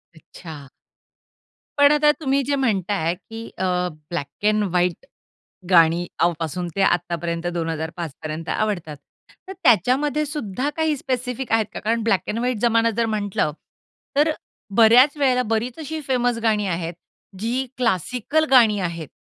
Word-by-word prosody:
अच्छा. 155 -2 -11 1.1
पण 285 0 +6
आता 300 0 +5
तुम्ही 275 -2 +1
जे 285 +2 0
म्हणता 210 -7 0
आहे 170 -3 0
की 225 +4 -10
अ, - - -3 0.5
ब्लॅक 170 +3 -5
अँड 215 0 +2
व्हाईट 180 -2 0 0.7
गाणी 170 0 +5 0.3
पासून 175 +2 -3
ते 195 - +2
आतापर्यंत 170 -2 0
2005 165 -1 -3
पर्यंत 155 +2 -5
आवडतात. 180 -8 -2 0.5
तर - - -5
त्याच्यामध्ये 265 - +3
सुद्धा 275 -3 -3
काही 315 -2 +1
स्पेसिफिक 255 -1 -3
आहेत 225 -1 +3
का? - - -6
कारण 230 +1 0
ब्लॅक 215 -4 +2
अँड 215 - -2
व्हाईट 245 -1 -1
जमाना 230 0 +3
जर 235 -1 +1
म्हटल, 210 -3 -2 0.8
तर 300 +2 +4 0.5
बऱ्याच 245 +6 +6
वेळेला 260 -3 +2
बरीच 235 +4 -3
अशी 315 0 -5
फेमस 245 -2 +1
गाणी 215 -3 +1
आहेत 170 -2 -3 0.4
जी 240 +6 -1
क्लासिकल 250 - 0
गाणी 230 -6 +6
आहेत. 170 -4 -4
220 Hz, 140 wpm, -22 LUFS, 175-255 Hz, 1.1 s, पण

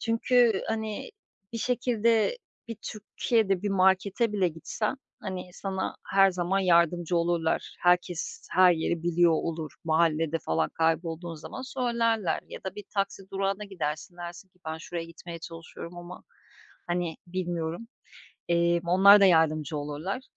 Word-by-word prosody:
Çünkü, 230 -2 +3
hani, 220 - -3 0.4
bir 230 - -3
şekilde 235 - +1 0.3
bir 230 - -5
Türkiye'de 210 -2 0
bir 205 - 0
markete 195 +4 +2
bile 195 -4 +2
gitsen, 170 - -3 0.2
hani, 185 -2 -6
sana 190 0 -3
her 195 0 +5
zaman 180 +1 0
yardımcı 175 -1 +3
olurlar. 170 -1 0
Herkes 175 -1 +1
her 185 -1 +6
yeri 165 0 -1
biliyor 175 0 +3
olur. 160 -2 -2
Mahallede 165 0 +2
falan 80 - 0
kaybolduğun 165 +1 -1
zaman 160 +11 -8
söylerler 235 -6 0
ya - - -8
da 190 -1 -4
bir 205 - -8
taksi 195 0 -1
durağına 195 +1 -1
gidersin, 175 -3 -4
dersin 175 +2 -8
ki; 180 - -33
"Ben 160 0 -4
şuraya 170 +1 -5
gitmeye 170 0 -9
çalışıyorum 170 +1 -9
ama, 175 +1 -10 0.6
hani, 175 -2 -2
bilmiyorum." 175 +2 -3 0.6
eee, 170 0 +3
onlar 200 +3 +8
da - - +7
yardımcı 160 -4 +3
olurlar 150 - -4
175 Hz, 135 wpm, -28 LUFS, 165-200 Hz, 0.6 s, onlar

